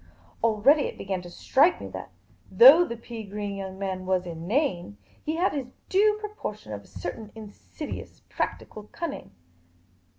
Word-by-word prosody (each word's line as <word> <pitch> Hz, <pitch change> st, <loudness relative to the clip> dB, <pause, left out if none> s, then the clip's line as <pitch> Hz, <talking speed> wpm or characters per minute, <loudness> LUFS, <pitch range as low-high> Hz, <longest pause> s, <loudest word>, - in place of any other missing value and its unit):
Already 230 Hz, +7 st, +4 dB
it -, -, -8 dB
began 190 Hz, -2 st, -3 dB
to 175 Hz, -, -10 dB
strike 285 Hz, -, +3 dB
me -, -, -6 dB
that, -, -, -7 dB, 0.4 s
though 470 Hz, -7 st, +9 dB
the 235 Hz, -8 st, -5 dB
pea 230 Hz, -1 st, -8 dB
green 205 Hz, 0 st, -5 dB
young 190 Hz, -1 st, -6 dB
man 190 Hz, -1 st, -4 dB
was 185 Hz, -1 st, +1 dB
inane, 175 Hz, -, -1 dB, 0.3 s
he 310 Hz, -, -1 dB
had 360 Hz, +3 st, +1 dB
his 275 Hz, -4 st, -3 dB, 0.2 s
due 420 Hz, +2 st, +4 dB
proportion 400 Hz, -, -6 dB
of 100 Hz, -, -6 dB
a -, -, -20 dB
certain 215 Hz, -2 st, -7 dB
in.sidious 220 Hz, +7 st, -8 dB
practical 210 Hz, -1 st, -4 dB
cunning. 335 Hz, -4 st, -5 dB
215 Hz, 155 wpm, -26 LUFS, 190-300 Hz, 0.4 s, though